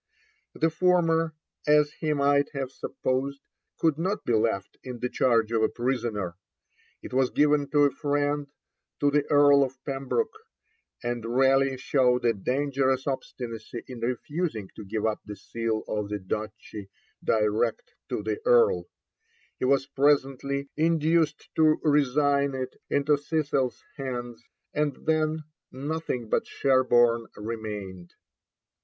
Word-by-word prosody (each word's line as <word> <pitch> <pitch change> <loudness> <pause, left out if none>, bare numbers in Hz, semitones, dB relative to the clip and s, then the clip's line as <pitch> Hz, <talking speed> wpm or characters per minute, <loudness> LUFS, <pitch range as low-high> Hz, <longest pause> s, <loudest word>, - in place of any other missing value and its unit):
The 160 +1 +1
former, 165 -1 +2 0.3
as 150 0 +4
he 155 - -2
might 140 0 +2
have 135 -2 -3
supposed, 135 +1 -2 0.4
could 160 -2 +1
not 190 +5 -1
be 120 - +1
left 110 -3 0
in 125 -2 -7
the 125 +1 -2
charge 115 -4 +2
of 115 -1 +1
a 110 - +3
prisoner. 115 -8 -2 0.7
It - - -8
was 130 -1 +3
given 145 -1 +2
to 145 0 +4
a 145 - +4
friend, 145 0 -1 0.5
to 145 0 +3
the 145 0 +1
Earl 145 -1 +6
of 130 0 -4
Pembroke, 140 - -1 0.7
and 120 -1 -2
Raleigh 135 +3 +3
showed 125 -2 +2
a 115 - +4
dangerous 130 +4 0
obstinacy 120 -4 -5
in 125 -2 -8
refusing 125 - -3
to - - -8
give 105 +2 -3
up 110 -1 0
the 105 - -8
Seal 115 0 -3
of 105 -1 -2
the 105 - -2
Duchy 105 +1 -6 0.3
direct 110 +1 0 0.2
to - - -2
the - - -2
Earl; 475 -1 +4 0.7
he - - 0
was 135 +1 +3
presently 140 -1 +1
induced 160 -1 +1
to 155 -1 +4
resign 145 -1 +2
it 130 -1 -4
into 145 0 +2
Cecil's 145 -4 -1
hands, 120 -4 -5 0.3
and 150 -2 0
then 155 0 +1 0.3
nothing 140 -3 -3
but - - 0
Sherborne 120 -3 +3
remained. 105 -5 -6
135 Hz, 135 wpm, -27 LUFS, 115-145 Hz, 0.7 s, Earl